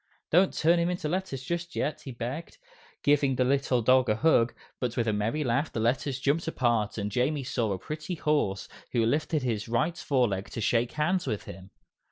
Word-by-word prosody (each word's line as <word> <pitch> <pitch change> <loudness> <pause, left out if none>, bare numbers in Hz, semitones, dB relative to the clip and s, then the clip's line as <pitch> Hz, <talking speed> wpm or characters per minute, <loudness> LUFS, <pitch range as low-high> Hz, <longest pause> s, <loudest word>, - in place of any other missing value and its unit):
"Don't 180 +4 +5
turn 170 +2 +3
into 175 -1 -1
letters 170 -6 -3
just 170 +4 -4
yet," 150 - -2
he 135 - -5
begged, 125 +7 -6 0.5
giving 145 -2 +3
the 130 - +2
little 130 -2 +1
dog 130 +2 +4
a 105 - +3
hug, 120 -3 +3 0.3
but 125 -1 -2
with 115 -1 +1
a 110 - +2
merry 110 +9 0
laugh 135 +4 0
the - - -3
Letters 130 +4 0
jumped 145 +5 0
apart 120 -9 0
and 105 -1 -2
Jamie 135 +6 0
saw 120 -4 -1
a 95 - -1
pretty 150 - -5
horse, 145 - 0 0.3
who 115 -2 +3
lifted 150 +4 0
his 110 -4 -2
right 135 +9 +1
fore 130 -4 +2
leg 95 0 -4
to - - -6
shake 115 +2 +1
hands 175 +4 0
with 105 - -2
him. 95 +2 -10
130 Hz, 200 wpm, -28 LUFS, 115-155 Hz, 0.5 s, Don't